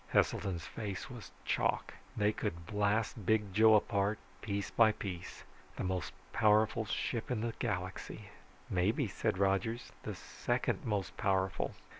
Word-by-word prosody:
Heselton's 90 -5 +2
face 100 -2 -5
was 120 -5 -8 0.2
chalk. - - +1 0.2
"They 105 0 +4
could 85 -6 -3
blast 105 +2 0
Big 105 -1 +2
Joe 110 +2 +7
apart, 100 0 +2 0.2
piece 100 -2 -2
by 110 -2 +5
piece 90 -4 -6 0.3
the - - -3
most 90 -3 -1 0.2
powerful 110 +1 +4
ship 115 +1 -2
in 120 -4 0
the 115 0 -1
galaxy." 95 -5 -3 0.4
"Maybe," 105 +8 +1
said 95 - -1
Rogers, 100 +5 +1
"the - - -5
second - - -1
most 100 -4 -1
powerful." 95 -2 +1
105 Hz, 135 wpm, -34 LUFS, 95-110 Hz, 0.4 s, Joe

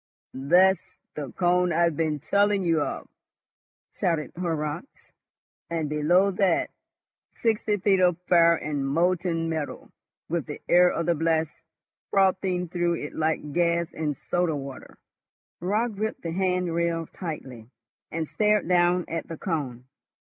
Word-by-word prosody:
"That's 180 +8 +3 0.2
the 145 -4 -6
cone 180 0 +2
I've 170 -1 +2
been 155 -1 0
telling 200 +5 +2
you 165 -3 +2
of," - - -4 0.9
shouted 165 -4 -1
Horrocks; 160 - -4 0.6
"and, 165 -3 -2
below 175 +6 +3
that, 185 -2 +1 0.6
sixty 220 -2 0
feet 195 0 +2
of 180 -2 +3
fire 170 -1 +6
and 145 -3 -3
molten 170 +2 +1
metal, 160 -3 -4 0.4
with 165 -2 -2
the 150 - -6
air 180 +1 +6
of 170 - -2
the 170 - +3
blast 160 0 -1 0.5
frothing 185 -2 +1
through 175 0 0
it 150 -2 -6
like 155 -2 -1
gas 170 -1 +1
in 150 -2 -2
soda 175 +3 -1
water." 135 -2 -8 0.6
Raut 210 +6 0
gripped 215 +2 -3
the 165 - -3
hand 180 -1 0
rail 170 -1 0
tightly, 130 - -8 0.4
and 160 -1 -3
stared 210 0 +1
down 175 0 +3
at 165 - -4
the 165 - -7
cone. 140 -9 -3
170 Hz, 135 wpm, -26 LUFS, 155-180 Hz, 0.9 s, fire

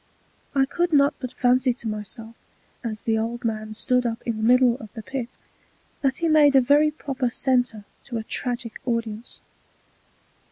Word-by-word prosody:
I 270 -1 +4
could 345 +4 -1
not 285 0 +5
but 255 -2 -5
fancy 250 0 +2
to 235 - -7
myself, 215 +2 -6 0.5
as 220 -2 -4
the 220 -1 +1
old 235 +2 -3
Man 215 -1 -3
stood 250 +2 +2
up 230 -1 -3
in 230 -2 -2
the - - -4
middle 250 +1 +5
of 215 - -10
the 220 - -7
Pit, 250 0 -5 0.6
that 270 -1 +1
he 335 - 0
made 300 -3 +5
a - - +9
very 290 +4 +4
proper 275 -4 -3
Center 245 -4 0 0.2
to 240 - -4
a 220 - -3
Tragick 240 0 -2
Audience. 230 -2 -3
245 Hz, 170 wpm, -24 LUFS, 225-270 Hz, 0.6 s, a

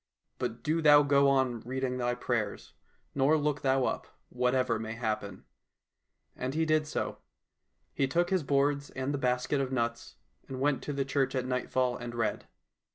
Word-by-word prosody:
But 120 -2 -4
do 160 +2 +1
thou 145 -1 +7
go 140 -1 +4
on 130 -3 +2
reading 130 +1 -3
thy 120 0 0
prayers, 120 -4 -3 0.4
nor 140 +3 +3
look 150 -1 -1
thou 135 -1 +2
up, - - -2 0.2
whatever 125 -2 +1
may 110 0 -4
happen." 110 -3 -4 0.9
And 130 +3 -4
he 160 0 +2
did 155 -1 +2
so. - - -3 0.7
He 135 - +1
took 175 +6 +1
his 190 -2 +2
boards 140 0 +1
and 130 +2 -3
the 140 - -2
basket 125 +2 0
of 135 -1 -2
nuts, 120 -2 -2 0.3
and 130 -1 -6
went 140 0 +1
to 145 - -3
the 140 -1 -1
church 135 0 0
at 130 -1 -1
nightfall 125 0 0
and 120 0 -7
read. 115 -2 -2
130 Hz, 170 wpm, -30 LUFS, 125-145 Hz, 0.9 s, thou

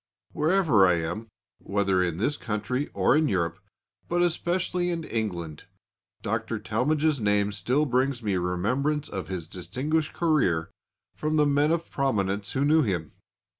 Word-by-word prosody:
Wherever 155 - +4
I 90 - +4
am, 85 +7 -3 0.3
whether 100 -2 +1
in 85 -3 -1
this 130 +10 0
country 115 +4 -2
or - - +3
in 155 0 +3
Europe, 85 -4 -1 0.5
but 175 0 +2
especially 175 +1 0
in 170 -2 -2
England, 90 - -4 0.6
Dr. 115 - -2
Talmage's 140 +8 0
name 105 -1 +2
still 125 +9 +1
brings 130 -1 0
me 100 -3 0
remembrance 125 +13 -1
of 95 -2 -5
his 90 -4 -4
distinguished 130 - -2
career 100 - +1 0.4
from 155 0 -1
the 150 -1 +4
men 145 +2 +3
of 170 0 -1
prominence 100 -7 -1
who 135 +2 +1
knew 155 +2 +5
him. 90 - -2
115 Hz, 145 wpm, -26 LUFS, 95-150 Hz, 0.6 s, knew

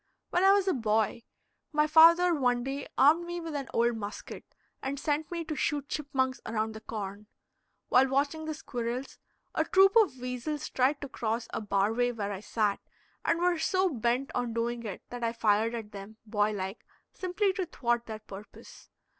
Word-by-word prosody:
When 355 - +2
I 385 - +7
was 400 -1 +3
a 375 - +3
boy, 220 -1 0 0.5
my 300 -1 +3
father 335 +3 +7
one 245 -5 +1
day 275 +2 -4
armed 310 +5 +5
me 345 0 -4
with 330 -2 -6
an 280 -2 -4
old 235 0 +2
musket 205 0 -8 0.3
and 275 +1 -3
sent 300 +1 -1
me 340 -1 -4
to 310 -1 -4
shoot 285 0 -1
chipmunks 265 -3 -1
around 220 0 -2
the 220 - -9
corn. 205 -1 -6 0.6
While 260 +1 +5
watching 285 +4 0
the 310 -1 -3
squirrels, 245 -2 -5 0.3
a - - +2
troop 390 +2 +5
of 410 - +4
weasels 250 +5 -4
tried 270 +3 +1
to 285 - -4
cross 230 -2 -3
a - - -2
bar 200 0 +1
way 245 +1 +1
where 205 -4 -4
I 195 - -4
sat, 210 -1 0 0.4
and 335 - +2
were 350 -1 +2
so 375 +3 +2
bent 250 +1 -1
on 245 -2 -2
doing 235 +1 -1
it 195 - -7
that 245 -1 -5
I 230 0 0
fired 225 +1 +2
at 220 -2 -6
them, 200 +2 -10
boy 210 -1 +1
like, 190 +1 -5 0.3
simply 380 +2 0
to 375 -2 -3
thwart 240 -6 -1
their 220 -1 -5
purpose. 205 0 -12
250 Hz, 190 wpm, -29 LUFS, 220-310 Hz, 0.6 s, I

